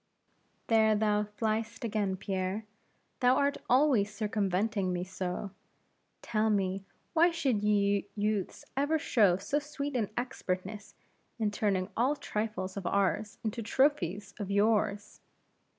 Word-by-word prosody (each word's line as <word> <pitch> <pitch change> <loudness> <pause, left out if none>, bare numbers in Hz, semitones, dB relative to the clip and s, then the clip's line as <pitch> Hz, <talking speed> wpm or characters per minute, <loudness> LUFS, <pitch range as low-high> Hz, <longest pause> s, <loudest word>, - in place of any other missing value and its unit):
"There 220 -1 +4
thou 210 0 +2
fly'st 225 +1 -1
again, 205 -4 -1
Pierre; 190 +2 -2 0.5
thou 250 0 +5
art 280 +1 +1
always 250 -6 +4
circumventing 205 -1 0
me 180 0 -1
so. 185 +1 -4 0.7
Tell 220 -1 +1
me, 195 -2 0 0.3
why 340 +1 +5
should 275 -11 0
ye 200 -1 +2
youths 210 -2 -1
ever 290 +4 +2
show 205 - +3
so 285 +10 -1
sweet 290 -1 -5
an 220 -5 0
expertness 210 -4 -4 0.4
in 215 -3 0
turning 200 -2 0
all 260 +6 +2
trifles 210 -7 -3
of 190 -3 -3
ours 200 +2 0
into 220 +1 -2
trophies 210 - +1
of 200 -2 -4
yours?" 205 0 +1
210 Hz, 125 wpm, -31 LUFS, 195-230 Hz, 0.7 s, thou